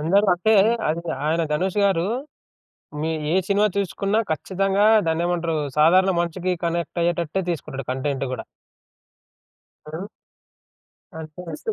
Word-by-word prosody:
అందరూ 195 +7 +3
అంటే, 220 +5 +2 0.3
అది 165 +2 -1 0.2
ఆయన 165 +2 +1
ధనుష్ 185 +6 -1
గారు 185 -4 +2 1.0
మీ 160 +1 -1 0.2
ఏ - - +3
సినిమా 205 +1 +3
చూసుకున్నా, 200 +2 0
ఖచ్చితంగా 195 +5 +1 0.2
దాన్నేమంటారు? 165 0 0 0.2
సాధారణ 185 +5 +5
మనిషికి 180 +2 -2
కనెక్ట్ 170 0 -2
అయ్యేటట్టే 170 +1 0
తీసుకుంటాడు 140 -5 -6
కంటెంట్ 135 +1 -2
కూడా. 125 - -5 1.4
ఆ! 160 +6 -6 1.1
అంటే 165 - -6
170 Hz, 110 wpm, -23 LUFS, 160-190 Hz, 1.4 s, సాధారణ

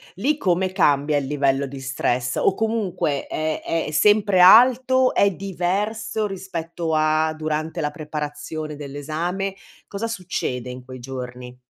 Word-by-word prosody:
Lì, 275 +11 0
come 185 - +1
cambia 145 -5 +2
il 140 -2 -2
livello 140 -1 +1
di 135 0 -8
stress, 125 -1 -1
o 190 - +2
comunque 210 -10 -1
è 155 0 -2 0.2
è - - -5
sempre 205 +3 +4
alto? 255 +6 +6
È 200 - +4
diverso 200 +4 -2
rispetto 175 -4 -4
a 155 0 +2
durante 155 +1 -3
la 150 - -1
preparazione 150 0 -5
dell'esame? 155 +7 -4 0.3
Cosa 210 +3 -4
succede 170 - -4
in 125 0 -9
quei 130 0 -10
giorni? 125 -1 -7
160 Hz, 135 wpm, -22 LUFS, 145-195 Hz, 0.3 s, alto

